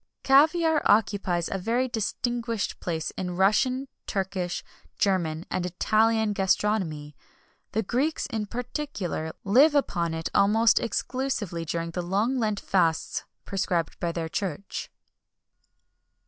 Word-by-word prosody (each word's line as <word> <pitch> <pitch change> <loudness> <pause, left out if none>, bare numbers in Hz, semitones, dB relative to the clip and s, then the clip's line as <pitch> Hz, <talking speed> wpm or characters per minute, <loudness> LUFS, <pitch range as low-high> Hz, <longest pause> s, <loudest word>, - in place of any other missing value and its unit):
Caviar 310 +3 +4
occupies 200 -5 +2
a 195 - -3
very 235 +7 0
distinguished 235 0 -2
place 160 -2 -3
in 180 -1 -4
Russian, 255 +8 +2 0.2
Turkish, 190 -2 -2 0.3
German, 170 -5 0
and 180 - -1
Italian 220 +4 +2
gastronomy. 190 -7 0 0.6
The 220 - +1
Greeks, 265 +10 0
in 220 -5 -3
particular, 235 - -4
live 275 +10 +5
upon 170 - +1
it 160 0 -3
almost 220 +3 +4
exclusively 230 -8 -2
during 165 +1 -3
the 180 - -3
long 205 +9 0
Lent 215 -3 0
fasts 165 -4 0 0.2
prescribed 180 -5 -1
by 170 - -1
their 165 -1 -3
Church. 190 +1 -4
200 Hz, 115 wpm, -26 LUFS, 175-235 Hz, 0.6 s, live